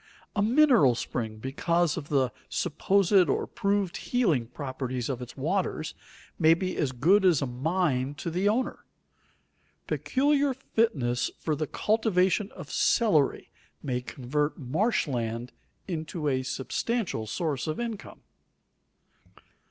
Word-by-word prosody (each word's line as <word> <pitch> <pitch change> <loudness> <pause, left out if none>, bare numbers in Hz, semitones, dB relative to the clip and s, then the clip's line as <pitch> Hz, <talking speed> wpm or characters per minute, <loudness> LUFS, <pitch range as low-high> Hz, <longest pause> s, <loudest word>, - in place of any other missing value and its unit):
A 205 - +2
mineral 235 - +5
spring, 110 -2 -4
because 160 +7 0
of 155 -3 -6
the 130 -4 +2 0.2
supposed 185 +1 +2
or - - +1
proved 200 -3 -1
healing 175 - +1
properties 130 -1 -4
of 130 -2 -3
its 125 +2 -9
waters, 160 +1 -1 0.5
may 160 0 +6
be 185 +1 -3
as 140 -4 0
good 170 +11 +3
as 175 -6 +5
a 140 - -1
mine 135 0 -1
to 165 - -4
the 185 +5 +1
owner. 240 +5 -1 1.0
Peculiar 280 0 +1
fitness 150 - 0
for 155 - -1
the 155 +1 -2
cultivation 205 - +1
of 175 -6 -9
celery 180 - +2 0.3
may 125 -2 -1
convert 145 +4 -2
marsh 160 - 0
land 120 -2 -3 0.4
into 160 -3 -3
a 130 -2 +1
substantial 135 - -2
source 150 - -2
of 155 - -2
income. 230 -3 -6
160 Hz, 125 wpm, -28 LUFS, 130-200 Hz, 1.0 s, may